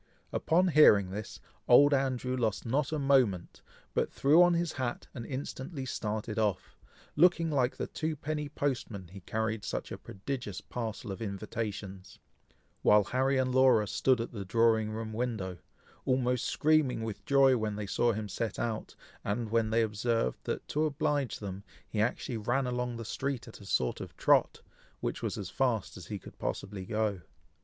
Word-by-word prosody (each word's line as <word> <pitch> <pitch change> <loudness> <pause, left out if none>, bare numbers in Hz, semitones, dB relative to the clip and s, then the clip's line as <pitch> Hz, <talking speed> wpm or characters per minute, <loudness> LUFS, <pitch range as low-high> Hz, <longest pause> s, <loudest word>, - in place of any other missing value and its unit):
Upon 180 +3 +3
hearing 105 - +6
this, 105 +2 -6 0.3
old 145 +4 +7
Andrew 130 -2 0
lost 115 -5 -1
not 135 +5 0
a 155 - 0
moment, 130 - +2 0.3
but - - 0
threw 150 +5 +5
on 175 -1 +5
his 170 -1 0
hat, 130 -3 -3
and 120 - -7
instantly 135 +1 -5
started 110 -2 -3
off, 105 -4 -1 0.4
looking 170 0 +4
like 130 -3 +1
the - - -2
twopenny 155 -1 -3
postman, 115 -11 -3
he 95 +2 -10
carried 110 +3 -2
such - - -4
a - - -6
prodigious 105 0 -5
parcel 115 -2 -5
of 95 - -6
invitations, 100 -2 -5 0.6
while 105 0 +6
Harry 130 +5 +1
and 130 -1 +1
Laura 130 -5 +5
stood 130 +3 +2
at 115 - -3
the 105 -4 -5
drawing 110 +2 +3
room 110 0 -5
window, 110 -7 -3 0.4
almost 125 -2 +1
screaming 150 -7 +2
with 110 -2 -5
joy 135 -2 +5
when 110 -3 -1
they 105 0 -4
saw 120 +4 +2
him 110 -1 -3
set 110 +1 -3
out, 115 -2 -3 0.3
and 110 +2 -2
when 115 -1 +2
they 115 +1 +3
observed 110 - 0
that, - - -3
to 155 +2 +1
oblige 145 -3 0
them, 100 -1 -6 0.2
he 105 - -1
actually 120 +1 -1
ran 120 +5 0
along 125 -1 -2
the 115 - -6
street 135 +2 -3
at 115 - -12
a - - -11
sort 65 - 0
of - - -9
trot, - - +3 0.4
which - - -3
was - - -2
as 95 -3 -5
fast 125 -7 0
as 90 -2 -10
he 105 - -4
could - - -13
possibly 95 -2 -4
go. 105 -3 -1
115 Hz, 170 wpm, -31 LUFS, 105-135 Hz, 0.6 s, old